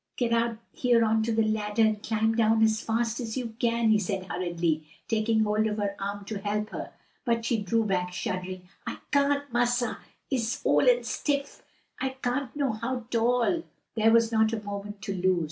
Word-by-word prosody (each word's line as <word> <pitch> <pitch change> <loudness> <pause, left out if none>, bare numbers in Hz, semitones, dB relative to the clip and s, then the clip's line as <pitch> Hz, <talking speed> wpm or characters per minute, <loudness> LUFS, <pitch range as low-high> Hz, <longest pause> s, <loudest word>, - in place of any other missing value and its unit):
"Get 235 -2 +1
out 230 -1 +1
here 240 -2 +3
on 220 0 +2
to 225 +1 0
the 225 0 +3
ladder 215 0 +1
and 215 -1 +2
climb 220 0 +1
down 225 -1 +3
as 220 0 +3
fast 230 +1 -1
as 230 -1 -4
you 235 -3 -3
can," 235 -1 +2
he 215 - +5
said 195 -1 -2
hurriedly, 170 -3 -1 0.2
taking 220 0 +2
hold 215 +1 +2
of 210 0 -2
her 200 -1 -1
arm 200 0 -4
to 210 -1 -4
help 210 +1 -2
her. - - -6 0.3
But 230 -2 0
she 230 -2 +1
drew 225 +3 +1
back 180 -3 0
shuddering. 185 0 -4 0.2
"I - - -3
can't, 285 -2 +2
massa! 240 -1 +1 0.3
I'se 240 +1 -1
ole - - +5
and - - +3
stiff. 280 -1 -2 0.4
I 265 0 -2
can't 250 +1 -1
no 280 -3 +1
how 235 +2 -3
'tall." 245 +7 +2 0.3
There 220 0 +3
was 230 0 +4
not 220 0 +3
a 215 -2 -3
moment 205 0 -6
to 200 -2 -2
lose. 185 -1 +2
220 Hz, 195 wpm, -28 LUFS, 205-235 Hz, 0.4 s, he